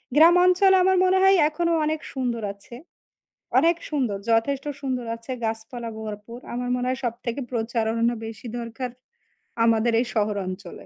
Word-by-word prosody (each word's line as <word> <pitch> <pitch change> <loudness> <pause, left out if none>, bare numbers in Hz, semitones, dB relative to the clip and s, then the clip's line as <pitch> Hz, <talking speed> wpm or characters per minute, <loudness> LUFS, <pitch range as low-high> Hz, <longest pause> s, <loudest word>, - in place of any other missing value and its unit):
গ্রাম 330 +3 +7
অঞ্চল 365 +2 +5
আমার 375 0 +4
মনে 375 +1 +3
হয় 385 0 +6
এখনো 335 +2 -1
অনেক 310 0 -1
সুন্দর 245 -4 -2
আছে। 200 +4 -11 0.8
অনেক 335 +4 +4
সুন্দর 255 -9 -1
যথেষ্ট 265 +5 +1 0.2
সুন্দর 255 -3 -3
আছে 230 +3 -8
গাছপালা 225 +1 -4
ভরপুর। 215 +2 -7
আমার 245 +1 -3
মনে 250 0 -1
হয় 260 +1 -2
সবথেকে 235 +2 -3
প্রচারণ 225 -1 -1 0.3
বেশি 225 +2 -9
দরকার 235 +2 -5 0.7
আমাদের 230 0 +3
এই 245 - +1
শহর 210 -2 +1
অঞ্চলে। 185 -1 -8
240 Hz, 150 wpm, -24 LUFS, 225-285 Hz, 0.8 s, গ্রাম